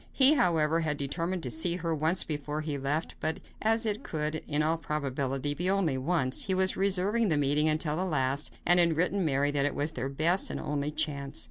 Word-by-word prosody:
He, 270 +2 +7
however, 165 - +2
had 155 -3 -1
determined 165 +6 -2
to 125 - -3
see 170 +4 +1
her 170 -2 -2
once 160 +4 0
more 155 - -1
before 145 +1 -4
he 150 -1 -3
left, 140 +4 -2
but 160 +1 -2 0.2
as 225 +1 +1
it 215 -1 -1
could, 155 -1 -3
in 150 0 0
all 160 +1 0
probability, 140 -2 -2
be 175 +5 -1
only 190 -8 +1
once, 135 -1 0
he 190 - 0
was 190 0 +3
reserving 200 +4 +1
the 160 -5 +1
meeting 145 +2 +2
until 155 0 0
the 185 - -1
last, 140 -4 -1
and 175 +1 +6
had 170 -2 +3
written 185 +3 +1
Mary 145 -2 +1
that 145 -1 +1
it - - -4
was 145 +2 -1
their 130 -2 -4
best 165 +7 +1
and - - -4
only 145 0 -2
chance. 150 -2 -3
155 Hz, 220 wpm, -29 LUFS, 145-180 Hz, 0.2 s, He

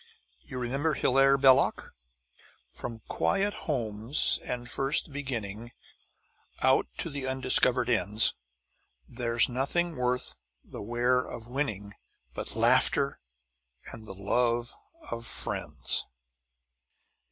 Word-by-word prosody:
You 130 - -10
remember 135 +5 -1
Hilaire 135 +1 +3
Belloc: 135 0 +3 0.8
From 115 -2 -8
quiet 195 - 0 0.2
homes 115 -1 +3
and 120 -1 -5
first 135 +5 0
beginning 120 -5 -5 0.9
Out - - +3
to - - -2
the 140 -2 -4
undiscovered 130 -1 +3
ends, 110 -3 +3 0.7
There's 120 -1 +2
nothing 145 +7 -1
worth 125 0 -1 0.3
the - - -10
wear 120 +4 +1
of 115 -2 -9
winning 110 -7 -4 0.4
But - - -5
laughter, - - +2 0.7
and 110 -1 -11
the 95 - -8
love 120 +5 0 0.4
of 115 0 -3
friends. - - -1
125 Hz, 100 wpm, -28 LUFS, 115-135 Hz, 0.9 s, Hilaire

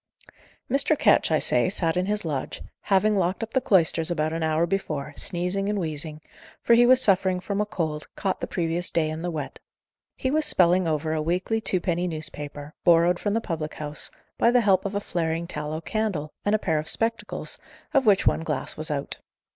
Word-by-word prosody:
Mr. 280 +4 +2
Ketch, - - +4
I 160 - +3
say, 125 0 +2
sat 165 -4 0
in 180 +1 0
his 210 -2 -1
lodge, 145 -5 -4 0.2
having 205 +2 +3
locked 185 +3 0
up 225 - -7
the 260 - +2
cloisters 165 -5 +3
about 155 -2 -1
an 165 - -3
hour 160 +1 +1
before, 155 -6 -3
sneezing 180 +3 -1
and 210 - -1
wheezing, 155 -3 -4 0.4
for 235 - +3
he 240 +1 +6
was 255 0 +6
suffering 190 -5 +3
from 200 +2 -2
a 210 - -1
cold, 155 -6 -3
caught 195 -2 -2
the - - -3
previous 170 0 -1
day 155 -2 0
in 155 +1 -5
the 175 - -2
wet. 150 -4 -5 0.6
He 260 - -2
was 310 +2 +2
spelling 180 - +4
over 155 0 -1
a 155 - -1
weekly 180 +7 -1
twopenny 180 -3 0
newspaper, 150 -2 -6
borrowed 175 0 +4
from 205 0 -1
the 230 - +1
public 160 -6 -4
house, 150 0 -5 0.3
by 235 - +5
the 245 0 +4
help 195 -3 +3
of 200 0 -3
a - - +1
flaring 165 -3 -2
tallow 155 -1 -4
candle, 190 -8 -2
and 205 +1 +2
a - - +3
pair 160 -6 0
of 155 - -4
spectacles, 225 0 -1 0.3
of 270 -4 +3
which 200 -2 +4
one - - +2
glass 150 -5 -3
was 155 0 -4
out. 140 -2 -4
175 Hz, 200 wpm, -25 LUFS, 155-205 Hz, 0.6 s, he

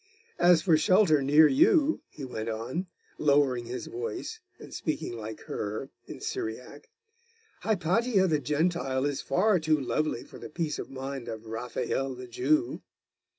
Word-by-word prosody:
As 175 -2 +5
for 165 -4 +5
shelter 160 -2 +4
near 150 +3 +6
you,' 320 - +4
he 140 - -8
went 115 -3 -4
on, 120 - -3 0.3
lowering 140 -5 +3
his 125 +2 -5
voice, 445 +3 -5 0.2
and - - -12
speaking 155 -5 -3
like 110 -1 -7
her, 110 +6 -5 0.2
in - - -8
Syriac 125 +6 -5 0.7
'Hypatia 200 +2 +2
the 155 -5 +2
Gentile 145 -1 0
is 145 -2 -1
far 200 0 +2
too 155 -1 +2
lovely 140 -1 -1
for - - -13
the - - -8
peace 160 -1 -3
of - - -6
mind 135 -1 -6
of 110 0 -6
Raphael 125 +3 -3
the 125 0 -8
Jew. 125 +2 0
145 Hz, 150 wpm, -28 LUFS, 125-175 Hz, 0.7 s, near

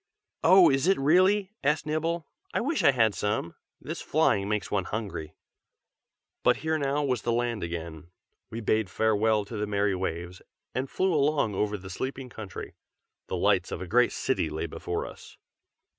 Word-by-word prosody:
"Oh! 185 0 +7
is 135 +4 +1
it 195 - +4
really?" 185 +7 +3
asked 150 +2 +1
Nibble. 160 +2 -1 0.3
"I - - +3
wish 290 +6 0
I - - +7
had 115 -5 +3
some! 105 -2 -2 0.3
this - - -6
flying 100 +1 +2
makes 105 -1 -2
one 100 -3 0
hungry." 100 -8 -5 1.1
But - - +4
here 160 0 +1
now 140 +1 0
was 125 -5 0
the 120 - -1
land 120 -2 0
again. 85 -2 -6 0.4
We 115 - -5
bade 110 -2 +1
farewell 110 0 +2
to 110 +2 -7
the 105 0 -2
merry 100 -1 +1
Waves, 90 -1 -4 0.3
and 130 +1 -2
flew 190 -1 +1
along 145 -7 +2
over 105 +2 -1
the 95 0 -10
sleeping 130 +5 -4
country. 110 -6 -8 0.5
The 95 - -2
lights 95 0 +2
of - - -3
a 90 - -5
great 120 +7 +3
city 105 -11 -1
lay 80 +2 -3
before 80 - -4
us. - - -12
110 Hz, 175 wpm, -28 LUFS, 100-145 Hz, 1.1 s, Oh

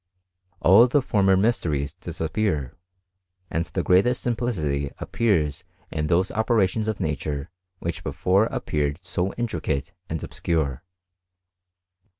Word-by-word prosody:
All 100 +8 +7
the 145 +4 +3
T 115 -6 0
mysteries 95 - +2
disappear, 80 - -2 0.8
and 85 0 -1
the 85 +4 -2
greatest 100 +8 +3
simplicity 85 - -1
irs 80 -11 0 0.3
in 75 -1 -1
those 90 +4 +2
operations 110 -2 +1
of 110 - -2
nature 75 0 -3 0.3
which 80 -2 -4
before 100 +5 +2
tred 75 -1 -1
so 95 0 -1
intricate 85 - -2 0.2
and 80 -1 -3
obscure. 75 -7 -1
90 Hz, 110 wpm, -24 LUFS, 75-110 Hz, 0.8 s, All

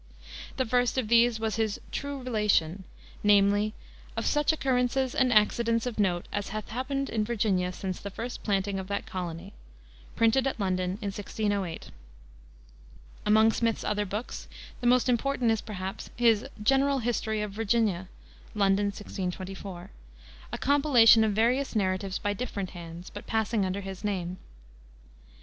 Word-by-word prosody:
The 260 - +1
first 245 +2 +1
of 240 -5 0
these 235 -1 +4
was 220 0 -1
his 220 -2 0
True 280 -2 -4
Relation, 205 -7 +1 0.4
namely, 205 +1 +4 0.4
"of - - -1
such 295 0 +3
occurrences 260 -3 +1
and 255 -1 +2
accidents 230 +1 +3
of 240 -3 -4
note 180 -4 +1
as 205 -1 -2
hath 215 +1 -5
happened 275 +4 -2
in 220 -2 0
Virginia 200 -5 0
since 185 0 -5
the 200 - -6
first 230 +5 -6
planting 195 -1 0
of 190 - -6
that 200 +2 -3
colony," 180 -6 -6 0.6
printed 245 +4 +3
at 265 - -3
London 185 -2 0
in 200 - -1
1608. 205 -3 -3 1.4
Among 220 +1 +6
Smith's 230 -1 0
other 210 -1 -1
books, 210 +5 -5 0.3
the 245 - -1
most 250 +1 +4
important 250 -1 +1
is 225 - 0
perhaps 190 -2 -6
his 230 -3 +3 0.2
General 270 +4 +3
History 220 -3 -1
of 210 - -4
Virginia 210 -3 0 0.5
(London, 200 0 +3
1624), 190 -1 -6 0.6
a - - -3
compilation 270 -6 +6
of 215 -1 +1
various 245 +5 +1
narratives 190 -1 0
by 205 -1 -1
different 205 -4 -4
hands, 170 0 -9
but 205 - -9
passing 220 -1 +1
under 190 +2 -3
his 195 0 -7
name. 185 -3 -2
215 Hz, 145 wpm, -28 LUFS, 195-240 Hz, 1.4 s, Among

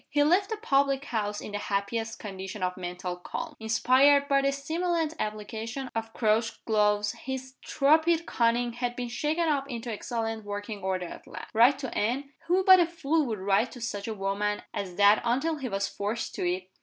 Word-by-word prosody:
He 290 0 +3
left 365 +7 +3
the 440 - -2
public 275 -8 +1
house 210 -4 -2
in - - -7
the 205 - -3
happiest 210 +3 -2
condition 190 -1 -6
of 180 0 0
mental 180 0 -5
calm. 300 - -6
Inspired 260 +6 +4
by 275 -1 +3
the 275 0 +2
stimulant 320 +3 -1
application 220 +5 -4
of 225 0 -3
Crouch's 225 0 +1
gloves, 210 -1 +2
his 260 0 -6
torpid 320 +4 +3
cunning 235 -1 +1
had 245 0 -3
been 245 -1 -4
shaken 305 +7 0
up 280 -2 0
into 235 -1 -4
excellent 225 0 -3
working 205 0 -5
order 185 -1 -1
at - - -10
last. 185 +6 -9
Write 240 +5 +6
to 265 -3 -6
Anne? 260 +6 -1 0.2
Who 365 +2 +3
but 375 0 +8
a 345 - +4
fool 325 -3 0
would 220 -2 -2
write 195 +5 +1
to 245 - -9
such 205 -3 -4
a 220 - -3
woman 205 +1 -1
as 190 -3 -4
that 205 +2 +5
until 270 +7 0
he 265 -4 -4
was 195 -1 -1
forced 210 +4 -3
to 175 - -1
it? 185 +1 -5
235 Hz, 195 wpm, -28 LUFS, 205-280 Hz, 0.2 s, but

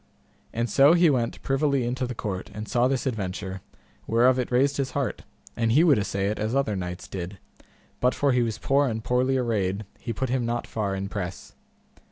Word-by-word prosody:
And 115 +1 -1
so 135 +8 +6
he 170 -2 +5
went 120 -4 -1
privily 140 -1 +1
into 125 +1 -2
the 125 - -5
court, 95 -4 -4
and 105 0 -5
saw 120 +1 +2
this 135 -1 -1
adventure, 95 -5 -3 0.5
whereof 125 +3 +4
it 125 - -1
raised 135 +3 +3
his 135 -2 -2
heart, 140 -3 -2 0.3
and 115 -1 +1
he 155 +6 +6
would 150 -9 +5
assay 100 -1 -1
it 105 - -3
as 110 +4 -1
other 135 -7 +1
knights 90 -1 -5
did, 95 +1 -6 0.6
but 125 +1 +2
for 140 -1 +2
he 125 -1 +3
was 115 -2 -1
poor 140 +4 +2
and 110 -2 -3
poorly 125 +2 +2
arrayed 105 -5 -1
he 120 - -4
put 130 +2 -2
him 125 0 0
not 120 0 -2
far 100 -3 -2
in 95 0 -3
press. 95 -2 -6
120 Hz, 205 wpm, -26 LUFS, 105-130 Hz, 0.6 s, so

